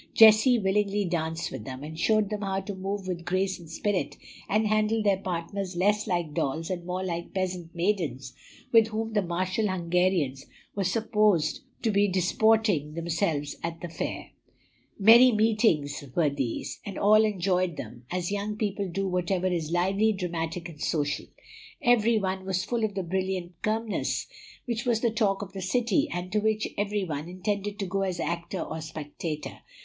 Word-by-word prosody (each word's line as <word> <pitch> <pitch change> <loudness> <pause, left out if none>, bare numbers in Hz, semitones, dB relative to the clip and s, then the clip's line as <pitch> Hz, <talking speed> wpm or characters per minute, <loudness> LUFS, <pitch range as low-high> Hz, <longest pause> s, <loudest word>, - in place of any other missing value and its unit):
Jessie 220 +3 +8
willingly 205 0 +1
danced 165 -2 -2
with - - -6
them, 130 +3 -7
and 160 +2 -7
showed 215 +3 +2
them 210 -1 -2
how 195 -1 -1
to 200 +1 -5
move 195 +1 -4
with 175 -2 -3
grace 185 +1 0
and 170 -2 -12
spirit, 195 +4 -1 0.3
and 215 +2 +2
handle 215 +1 +2
their 200 -2 +3
partners 185 +1 -4
less 205 +4 +2
like 175 -5 -1
dolls 155 +5 -1
and 175 -1 -4
more 185 +1 -2
like 170 -1 -4
peasant 180 -2 -3
maidens 170 -9 -1 0.4
with 225 -2 +6
whom 225 0 -3
the 210 - +3
martial 185 +4 -1
Hungarians 175 -6 0 0.3
were 200 - 0
supposed 210 -4 +2 0.2
to 225 - +2
be 205 0 +3
disporting 190 -3 +2
themselves 165 -3 -1
at 165 0 -4
the 175 - -5
fair. 165 - -5 0.7
Merry 235 +5 +8
meetings 210 -10 +2
were 155 -4 +3
these; 135 -5 -3
and 200 - -6
all 215 +2 +6
enjoyed 185 -4 0
them, 120 0 -8
as 180 0 -2
young 205 +1 -2
people 200 -2 -2
do 195 +3 -2
whatever 180 0 0
is 170 -4 -1
lively, 195 +5 +2
dramatic, 170 -3 -3
and 155 -3 -12
social. 145 -2 -1 0.5
Every 235 -3 +4
one 190 -2 -1
was 190 -1 -1
full 235 -2 -1
of 210 -3 -1
the 190 - -1
brilliant 185 -1 -3
Kirmess, 220 0 -1 0.4
which 235 -2 -2
was 235 -3 +1
the 235 - +2
talk 205 -3 +1
of 195 -1 -10
the 195 - -5
city, 225 +2 +1
and 175 +1 -4
to 210 - +2
which 215 0 +1
every 205 0 -1
one 155 -2 -4
intended 200 +3 -3
to 200 - -2
go 195 +2 -1
as 185 -2 -1
actor 170 +2 -2
or 160 0 -5
spectator. 155 0 -6
190 Hz, 175 wpm, -27 LUFS, 170-210 Hz, 0.7 s, Jessie